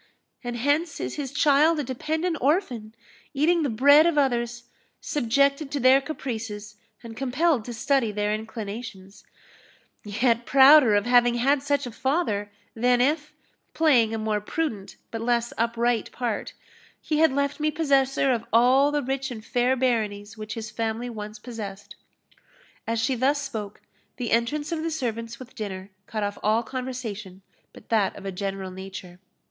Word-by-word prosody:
And 240 -1 -4
hence 285 +5 0
is - - -3
his 280 -3 -5
child 300 +2 +4
a - - 0
dependent 315 +7 -2
orphan 250 - 0 0.4
eating 330 +5 +3
the 290 - 0
bread 285 +7 +6
of 335 -3 0
others 240 -3 0 0.4
subjected 280 +2 +1
to 285 - -2
their 260 +2 +5
caprices, 220 -7 -6 0.3
and 230 -1 -9
compelled 270 0 +1
to 240 - -6
study 265 -2 +1
their 210 0 -1
inclinations; 215 -2 -7 0.8
yet 235 +3 +1
prouder 270 -3 +7
of 205 +1 +2
having 245 -1 +4
had 270 +4 +2
such 285 0 0
a 245 - -6
father, 225 -6 -1 0.2
than 245 +2 +2
if, 295 +4 +1 0.4
playing 255 -9 +4
a 225 - -2
more 215 -1 -1
prudent 215 -4 -4 0.2
but 225 - -4
less 235 0 0
upright 235 0 0
part, 235 -4 -3 0.5
he 305 -1 -1
had 320 -2 +5
left 280 +2 -1
me 305 0 +1
possessor 275 -3 +2
of 235 -3 0
all 255 +5 +5
the 295 -1 0
rich 270 +1 -2
and 225 -3 -8
fair 250 +1 +1
baronies 215 -5 -1
which 215 -1 -7
his 220 -1 -6
family 225 +2 -3
once 210 -1 -7
possessed." 210 -4 -8 0.9
As 230 0 0
she 225 +4 +1
thus 265 +4 +1
spoke, 220 -8 -6 0.4
the 245 -3 -3
entrance 290 +7 0
of 325 -2 -2
the 330 - -2
servants 230 -6 -4
with 255 -1 -12
dinner 195 -2 -6 0.2
cut 215 -2 -3
off 205 0 -3
all 220 +2 +2
conversation 225 -7 -6 0.3
but - - -16
that 215 -4 +1
of 195 - -10
a 195 - -3
general 195 0 -4
nature. 185 -1 -9
240 Hz, 160 wpm, -25 LUFS, 215-280 Hz, 0.9 s, prouder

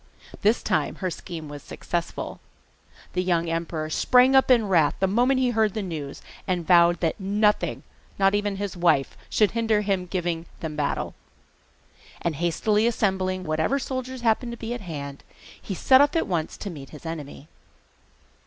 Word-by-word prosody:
This 215 +3 +2
time 150 -2 0
her 185 -2 -3
scheme 165 -2 -7
was 145 0 -8
successful. 170 +4 -4 0.7
The 180 - +1
young 170 -2 +1
emperor 165 -1 -3
sprang 255 +9 +4
up 265 - +5
in 235 -4 +5
wrath 165 -6 +3
the 190 - +3
moment 245 +7 +2
he 255 -1 +2
heard 220 -3 +1
the 215 - -2
news, 155 -6 -6 0.2
and 180 -3 -1
vowed 170 0 +5
that 165 +2 0
nothing, 210 +2 +1 0.3
not 195 0 +3
even 205 -1 0
his 200 -1 -4
wife, 170 -6 +2
should 210 -2 +3
hinder 225 -2 +1
his 195 -3 -1
giving 175 -3 -2
them 160 -3 -5
battle. 145 -1 -2 1.1
And 165 -4 -2
hastily 210 +7 +1
assembling 190 -5 0
whatever 160 - 0
soldiers 260 -1 -4
happened 235 +1 +1
to - - -8
be 230 +1 -4
at 245 - -6
hand 140 -6 -7 0.4
he 195 - -5
set 260 +8 +6
off 290 +3 +3
at 330 - +2
once 165 -4 -2
to 200 - -6
meet 140 -5 -9
the 155 +2 -10
enemy. 150 -2 -7
185 Hz, 170 wpm, -25 LUFS, 165-220 Hz, 1.1 s, set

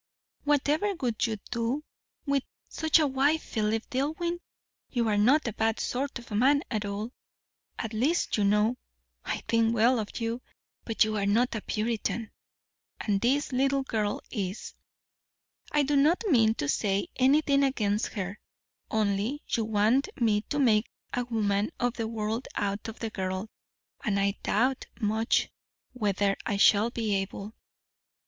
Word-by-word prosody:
Whatever 295 +7 +2
would 245 -7 0
you 220 -1 -2
do 235 +5 -1 0.4
with 280 -2 +2 0.3
such 315 -1 +3
a 315 - +3
wife, 285 +3 +2
Philip 220 0 -1
Dillwyn? 320 +6 -1 0.5
You 235 -3 0
are 210 - +2
not 260 +7 +4
a 235 - -2
bad 225 +1 0
sort 275 +3 -2
of 240 -1 -13
man 270 +8 +3
at 215 -3 -1
all; 205 +3 -4 0.7
at 225 -1 -4
least 275 +11 +1
you 210 - +1
know 210 +4 +3 0.5
I - - -2
think 230 0 +2
well 235 +2 +4
of 215 +2 -5
you; 230 +1 -2 0.4
but 225 - +3
you 215 0 -1
are 200 -1 0
not 235 +5 +2
a 215 - -3
Puritan, 225 +1 -2 0.7
and 200 -2 0
this 280 +5 +1
little 270 +1 +2
girl 215 -5 -1
is. 195 -3 -4 1.0
I 295 -1 +3
do 285 +1 +1
not 305 +9 +4
mean 225 - +4
to 145 - -2
say 195 +6 0
anything 280 +2 +4
against 215 -6 +1
her; 200 -1 -4 0.5
only, 215 +6 0
you 225 - +1
want 220 - +2
me 215 -3 +3
to 290 - -1
make 230 -6 +3 0.3
a 245 - -1
woman 210 -3 0
of 245 -1 +1
the 230 -2 -3
world 225 +2 -3
out 200 0 -2
of 225 - -7
the 225 -1 -4
girl 190 +2 -3 0.5
and 200 -2 +1
I 200 +1 0
doubt 255 +5 +1
much 220 +1 +1 0.4
whether 205 -4 +1
I 205 - -1
shall 205 +2 +5
be 225 -3 -1
able. 200 +2 -5
225 Hz, 155 wpm, -28 LUFS, 210-265 Hz, 1.0 s, shall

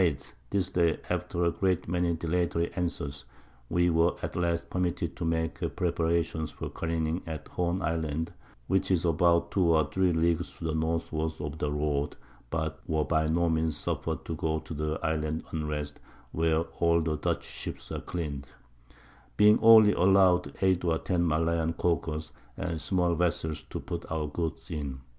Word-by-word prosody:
_ 70 -6 0 0.2
This 95 -1 0
Day, 85 -4 +2
after 85 0 -1
a 85 - +3
great 95 -2 0
many 85 0 +1
dilatory 85 +1 0
Answers, 70 -6 -3 0.4
we 90 +1 +3
were 85 +1 +3
at - - -3
last 85 -1 0
permitted 90 -3 -1
to 85 - -2
make 80 0 -1 0.2
Preparations 85 -2 0
for - - -7
careening 80 +1 -1
at 80 -2 -6
Horn 90 +1 -1
Island, 80 0 -1 0.3
which 95 +5 +1
is 90 -2 +2
about 85 +1 +3
2 95 - +2
or 80 -4 +2
3 95 -1 +2
Leagues 85 +1 0
to - - -10
the 80 -1 -1
Northward 80 0 -1
of 75 +1 -5
the 75 -3 -1
Road, 75 -1 -1 0.3
(but 80 +1 -2
were 80 -1 +1
by 80 -1 +1
no 85 +2 +2
Means 80 -2 +1
suffer'd 75 - -3
to - - -3
go 80 0 0
to 80 - -8
the 75 +1 -2
Island 80 0 -1
Unrest, 75 -2 -3 0.3
where 80 0 +2 0.2
all 85 0 +4
the 80 -1 -1
Dutch - - -1
Ships - - -7
are - - -3
clean'd) 75 -6 -4 0.9
being 105 +1 +6
only 110 -2 +8
allow'd 90 -5 +4
8 95 -2 +3
or 85 -2 +2
10 85 -1 0
Malayan 80 +1 +1
Caulkers 80 -2 -1 0.3
and 85 -3 -3
small 90 -2 +1
Vessels 80 -2 0
to - - -4
put 85 -1 -6
our 80 -1 -1
Goods 80 +3 -4
in. 70 -4 -4
80 Hz, 165 wpm, -29 LUFS, 80-85 Hz, 0.9 s, only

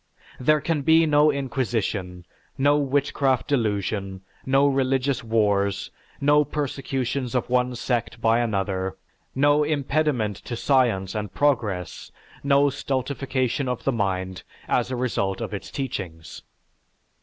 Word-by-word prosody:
There 150 +4 +3
can 160 -3 0
be 160 +3 +5
no 150 0 +4
inquisition, 115 -9 -2 0.3
no 145 +1 +4
witchcraft 140 -2 +1
delusion, 100 -7 -1 0.3
no 135 +1 +4
religious 135 -1 +1
wars, 100 -3 +1 0.3
no 145 +1 +4
persecutions 135 -3 -3
of 125 0 -1
one 125 0 +1
sect 120 -1 -2
by 115 +1 +3
another, 95 -4 -1 0.4
no 145 +2 +4
impediment 145 -7 0
to 120 - -6
science 115 -8 +1
and 105 -3 -4
progress, 110 -11 -1 0.3
no 140 0 +4
stultification 135 0 -2
of 125 - -3
the 135 - +1
mind, 95 -5 -2 0.3
as 120 0 +1
a 130 - -2
result 110 -6 -1
of 110 -3 -5
its 100 - -6
teachings. 85 - -6
125 Hz, 120 wpm, -24 LUFS, 105-140 Hz, 0.4 s, be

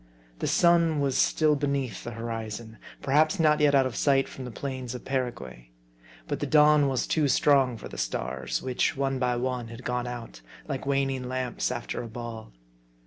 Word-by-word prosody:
The - - -1
sun 170 -3 +4
was 140 -2 0
still 155 -2 +3
beneath 140 -6 -2
the - - -5
horizon; 115 -1 -6 0.2
perhaps 155 +7 +3
not 155 -2 +4
yet 145 -1 +4
out 135 -1 +5
of 130 - -3
sight 135 -2 +3
from 130 - -8
the - - -5
plains 130 0 -5
of 125 - -9
Paraguay. 90 - -4 0.6
But - - -2
the - - -2
dawn 150 -1 +5
was 130 -3 0
too 155 -3 +1
strong 135 -3 +3
for - - -8
the - - -8
stars; - - -3
which, 130 +2 0
one 135 -1 0
by 125 -1 +1
one, 125 -1 -2
had 115 +2 -10
gone 125 0 -2
out, 115 - -7 0.3
like 135 0 -4
waning 135 -2 0
lamps 130 -1 -2
"after 120 -1 -4
a 120 - -6
ball. 115 - -7
130 Hz, 185 wpm, -27 LUFS, 120-140 Hz, 0.6 s, out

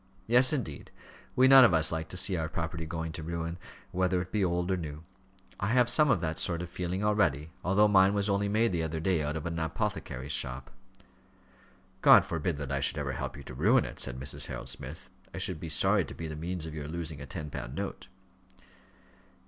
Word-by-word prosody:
"Yes, 125 +4 +6
indeed; 115 - -4 0.5
we 130 +1 +5
none 135 0 +9
of 95 -9 +5
us 80 0 +3
like 80 -1 -4
to 90 - -6
see 95 +1 +3
our 80 -2 -2
property 80 0 -4
going 80 0 -4
to 80 - -7
ruin, 85 +1 -4 0.3
whether 90 0 +1
it 90 +1 -6
be 105 -2 0
old 90 0 0
or - - +2
new. 80 -3 -7 0.6
I 100 - -1
have 125 +2 +3
some 150 +4 +5
of 115 -10 +2
that 80 -2 -2
sort 85 -1 0
of 90 - -9
feeling 90 +2 -3
already, 80 -8 +1
although 100 +3 +4
mine 100 0 +4
was 100 0 0
only 100 0 0
made 110 +2 +2
the 85 -2 -1
other 80 0 -3
day 85 0 +1
out 75 +1 -2
of 75 - -6
an 85 -1 -3
apothecary's 75 -4 -3
shop." 65 -2 -2 1.3
"God - - +7
forbid 85 -1 -2
that 70 -2 -5
I 70 - 0
should 70 - 0
ever - - -2
help - - -5
you - - -10
to - - -10
ruin 65 - +3
it," - - -8
said 65 -1 -1
Mrs. 70 +2 -1
Harold - - -6
Smith. - - -8 0.3
"I - - -6
should 90 -4 -1
be 80 - -6
sorry - - +3
to - - -10
be 80 - -6
the 80 - -6
means 85 +1 -4
of 80 - -7
your 75 -2 -6
losing 80 -2 -6
a - - -8
ten 75 -2 -6
pound - - -6
note." - - -5
85 Hz, 220 wpm, -29 LUFS, 80-95 Hz, 1.3 s, none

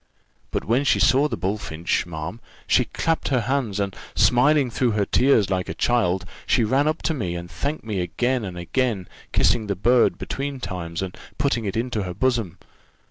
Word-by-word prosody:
But - - -3
when 120 +5 +2
she 145 - +3
saw 135 +4 +4
the - - -4
bullfinch, 90 -3 -2
ma'am, 85 +5 -6 0.3
she - - +3
clapped 165 0 -1
her 130 -3 +2
hands, 120 -4 -1
and, 100 -1 -2 0.2
smiling 130 +1 +4
through 120 0 +1
her 105 -1 +1
tears 115 -6 +3
like 90 -1 -1
a 80 - -4
child, 95 -6 +1 0.2
she 120 - +3
ran 135 +7 +2
up 155 +2 -1
to 160 - +1
me, 95 - -3
and 85 0 -7
thanked 140 - -3
me 105 -4 -3
again 120 +8 0
and 90 -3 -6
again, 100 +1 -1 0.2
kissing 115 -3 +2
the 100 - -1
bird 120 +6 +3
between 140 0 -4
times, 90 -5 -4
and 95 -1 -6 0.2
putting 120 -5 0
it 100 +1 -2
into 115 -2 -1
her 90 -2 -5
bosom. 115 -6 0
110 Hz, 190 wpm, -23 LUFS, 90-130 Hz, 0.3 s, saw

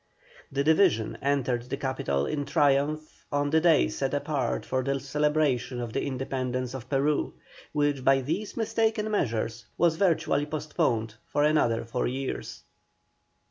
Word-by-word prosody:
The 140 0 0
division 160 - +3
entered 130 -3 0
the 135 - -2
capital 75 - -1
in 145 -2 -2
triumph 150 +1 +1
on 145 0 0
the 160 0 +4
day 165 - +5
set 60 0 -2
apart 60 -1 -1
for 130 - 0
the 135 +1 0
celebration 140 -3 0
of 120 -2 -5
the - - 0
Independence 130 -1 -3
of 130 -1 -8
Peru, 145 +2 +1 0.4
which 145 -2 0
by 135 +1 +4
these 170 +11 -3
mistaken 220 -1 0
measures 115 - -1
was 165 -1 +3
virtually 165 -5 +2
postponed 150 -7 -1
for 145 - +1
another 150 -7 +2
four 115 +2 -1
years. 130 +2 -4
140 Hz, 140 wpm, -27 LUFS, 125-155 Hz, 0.4 s, day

